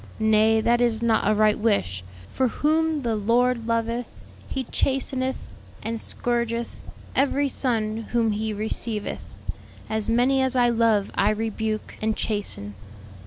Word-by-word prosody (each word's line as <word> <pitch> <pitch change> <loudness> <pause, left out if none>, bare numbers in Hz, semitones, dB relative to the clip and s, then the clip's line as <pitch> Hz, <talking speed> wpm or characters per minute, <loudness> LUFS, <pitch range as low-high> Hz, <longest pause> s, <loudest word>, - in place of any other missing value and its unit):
Nay, 220 0 +4
that 240 +2 +2
is 235 -2 +1
not 225 -2 +2
a 215 - +3
right 215 0 +3
wish, 150 - 0 0.3
for 260 - +1
'whom 310 +3 +1
the 230 -2 0
Lord 235 +2 +1
loveth 230 +1 -1 0.4
He 265 - -3
chasteneth, 260 +1 -1 0.3
and 225 0 -3
scourgeth 235 -1 -2 0.4
every 280 +1 +2
son 225 -5 -1
whom 230 -2 +2
He 215 +1 -2
receiveth.' 215 0 -4 0.6
'As 220 -1 -1
many 250 +4 +3
as 260 0 +1
I 245 -1 +4
love 225 -3 +2
I 200 - +2
rebuke 220 0 -2
and 220 0 0
chasten.'" 200 - -1
230 Hz, 135 wpm, -24 LUFS, 215-245 Hz, 0.6 s, Nay